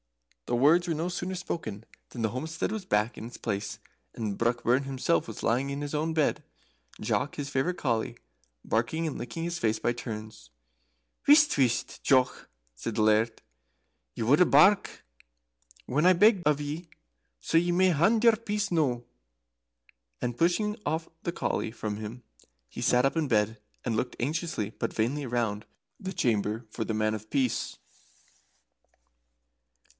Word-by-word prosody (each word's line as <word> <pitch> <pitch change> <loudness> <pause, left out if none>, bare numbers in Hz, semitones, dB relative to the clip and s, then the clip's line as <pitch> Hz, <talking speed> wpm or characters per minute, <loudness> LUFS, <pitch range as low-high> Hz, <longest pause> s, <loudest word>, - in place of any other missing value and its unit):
The - - 0
words 160 +7 +5
were 165 - 0
no 165 +3 -1
sooner 180 +1 -3
spoken 115 - -5 0.2
than 120 - -5
the 110 - +2
homestead 160 - -3
was 220 -3 -4
back 105 - +1
in 110 - -6
its 120 - -9
place, 100 -3 -3 0.4
and 105 -3 -3
Brockburn 120 +3 +2
himself 135 +5 0
was 110 - -8
lying 125 +4 +1
in 140 0 -3
his 145 0 -5
own 160 +2 0
bed, 155 -2 +1 0.6
Jock, 145 - -1
his 140 -1 -4
favourite 140 +6 0
collie, 115 -5 -1 0.5
barking 120 +9 0
and 150 - -4
licking 120 +7 -5
his 170 0 -3
face 110 -6 +1
by 120 - +1
turns 110 - -7 0.7
for - - -28
joy. - - +7
"Whisht, 295 0 +7
whisht, 125 -4 0
Jock!" 130 -2 +2 0.2
said 85 - -5
the 110 - +1
Laird. 110 +1 +2 0.7
"Ye - - -2
wouldna 145 +10 +5
bark 190 +8 +4 0.8
when 150 +6 +1
I 185 - +8
begged 200 0 +4
of 150 -1 +3
ye, 150 +3 -5 0.5
so 165 - +1
ye 175 +1 0
may 185 +2 +4
hand 195 +8 +3
your 230 -2 +7
peace 210 -2 -2
noo." 135 -8 +1 1.2
And 120 -1 -2
pushing 195 +5 +2 0.5
the 170 - -2
collie 110 - -2
from 110 -2 -4
him, 110 +3 -7 0.4
he - - -8
sat 125 +1 +3
up 135 - +1
in 160 -2 +1
bed 105 0 +1 0.2
and 115 -3 0
looked 125 +3 -2
anxiously 145 - -2
but - - -4
vainly 135 +6 0
round 115 -4 -1 0.3
the 190 - -5
chamber 110 - 0
for 115 - -3
the 110 - -3
Man 110 0 +1
of 110 0 -7
Peace. 130 -4 0
130 Hz, 160 wpm, -28 LUFS, 115-165 Hz, 1.2 s, I